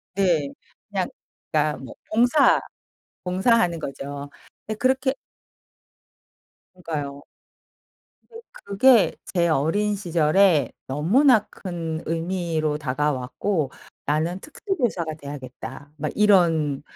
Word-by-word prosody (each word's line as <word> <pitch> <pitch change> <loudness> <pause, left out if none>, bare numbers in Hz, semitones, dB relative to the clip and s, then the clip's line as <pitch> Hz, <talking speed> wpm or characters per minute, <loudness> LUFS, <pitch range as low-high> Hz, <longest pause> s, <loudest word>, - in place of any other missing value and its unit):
네. 170 -8 +2 0.4
그냥 - - -1 0.4
그러니까 150 -1 +1
뭐 130 - -9 0.2
봉사, 245 +6 +4 0.6
봉사하는 185 -1 +2
거죠. 140 0 -6 0.4
네 215 - -2
그렇게 260 +3 +1 1.6
그러니까요. 145 -5 -5 1.3
근데 - - -16 0.5
그게 - - -20 0.2
제 170 -2 +3
어린 170 +8 +1
시절에 170 - +3 0.2
너무나 210 - +3
큰 165 -4 -5
의미로 165 -2 -1
다가왔고 145 +3 -1 0.3
'나는 160 +5 0
특수 385 +6 -4
교사가 180 - -1
돼야겠다.' 145 -1 -9
막 150 0 -3
이런 165 -9 +3
165 Hz, 210 characters per minute, -24 LUFS, 145-200 Hz, 1.6 s, 봉사